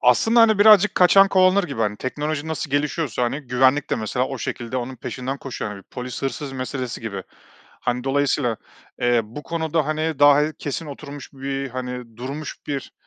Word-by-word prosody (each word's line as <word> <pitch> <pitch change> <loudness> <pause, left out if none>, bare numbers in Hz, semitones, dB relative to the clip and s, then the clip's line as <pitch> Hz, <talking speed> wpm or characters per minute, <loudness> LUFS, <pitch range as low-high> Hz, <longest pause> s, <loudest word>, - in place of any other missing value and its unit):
Aslında 225 - +4
hani 220 -2 +5
birazcık 210 -1 +7
kaçan 195 +2 +6
kovalanır 185 +1 +4
gibi 140 -9 -5
hani, 105 -1 0
teknoloji 150 +4 -3
nasıl 160 -2 -3
gelişiyorsa, 145 -2 -1
hani, 125 +5 -1
güvenlik 130 +2 +2
de - - +1
mesela 120 +4 -1
o 135 -1 -5
şekilde 120 +1 -4
onun 130 +1 -4
peşinden 130 +3 -5
koşuyor. 125 -6 -5
Hani 100 -1 -9
polis 125 +6 -7
hırsız 135 0 -3
meselesi 130 -1 -4
gibi. 100 -4 -5 0.6
Hani, 125 +1 -2
dolayısıyla, 135 -3 +1 0.4
eee, 120 -1 +3
bu 120 +8 -9
konuda 160 0 -1
hani, 155 -1 -1
daha 145 +2 +5
kesin 150 +3 -5
oturmuş 145 -1 -9
bir, 135 0 -4
hani, 125 -2 -6
durmuş 140 +5 -6
bir 140 -2 -4
135 Hz, 170 wpm, -22 LUFS, 125-155 Hz, 0.6 s, birazcık